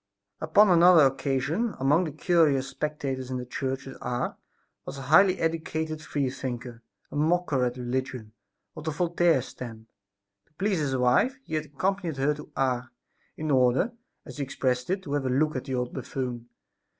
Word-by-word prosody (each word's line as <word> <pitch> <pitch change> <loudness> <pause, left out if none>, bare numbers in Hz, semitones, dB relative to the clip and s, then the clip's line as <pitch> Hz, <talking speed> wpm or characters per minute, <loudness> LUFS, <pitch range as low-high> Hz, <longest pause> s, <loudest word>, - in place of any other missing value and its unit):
Upon 190 +6 +5
another 170 -3 +7
occasion, 140 - 0
among 145 +7 +3
the 155 - -4
curious 150 -4 +2
spectators 140 -4 -3
in 130 - -2
the 125 - -5
church 135 +2 -4
at 135 - -9
Ars 120 0 -2 0.5
was 140 - -7
a 135 - -6
highly 185 +7 +5
educated 160 -1 -2
freethinker, 125 -5 -4 0.3
a - - -7
mocker 155 -3 +1
at 125 0 -1
religion, 125 -2 -3 0.4
of - - -9
the - - 0
Voltaire 170 -3 +2
stamp. 115 -2 -9 0.6
To - - -36
please 190 +2 0
his 135 -3 0
wife 125 - +3
he 160 - -10
had 155 -1 0
accompanied 175 +2 -2
her 140 +3 +2
to 150 +1 -11
Ars, 130 -2 0 0.5
in 155 -1 -2
order, 130 - +3 0.3
as - - -10
he 145 - -1
expressed 130 -1 -1
it, 190 +1 -1
to 145 - -5
have 140 -2 0
a - - 0
look 150 +4 +1
at 130 - -3
"the 135 -2 -3
old 125 0 -2
buffoon." 120 -3 -5
140 Hz, 175 wpm, -27 LUFS, 130-160 Hz, 0.6 s, another